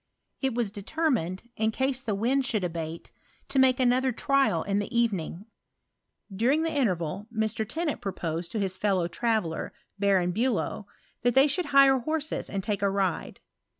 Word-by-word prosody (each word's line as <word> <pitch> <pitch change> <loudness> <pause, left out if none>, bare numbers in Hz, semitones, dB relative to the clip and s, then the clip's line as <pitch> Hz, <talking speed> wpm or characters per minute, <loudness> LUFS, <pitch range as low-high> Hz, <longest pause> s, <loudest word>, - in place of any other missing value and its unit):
'' - - -39
It 265 -4 0
was 235 -5 -1
de 205 - -8
termined, 220 - -1
in 220 0 +1
case 265 +3 0
the 215 -5 -2
wind 255 +7 +1
should 215 -6 +1
abate, 165 -1 -5 0.4
to 270 - +2
make 260 0 +4
another 255 +1 +3
trial 260 - +1
in 200 0 0
the 205 - -3
evening. 195 -5 -1 0.9
During 260 +10 +2
the 325 - -1
interval 190 - -1
Mr. 220 -1 -2
Tennant 320 -2 -2
proposed 170 -3 -3
to 220 - -1
his 190 -2 -2
fellow 190 -4 +1
traveller, 215 -6 -1 0.3
Baron 190 -3 +2
Bulow, 220 -1 -1 0.3
that 245 -1 +1
they 270 +1 +7
should 350 +5 +1
hire 275 -2 +5
horses 310 +4 -2
and 195 -1 -3
take 205 -1 -2
a 200 - +2
ride. 195 -3 -2
220 Hz, 170 wpm, -27 LUFS, 190-265 Hz, 0.9 s, they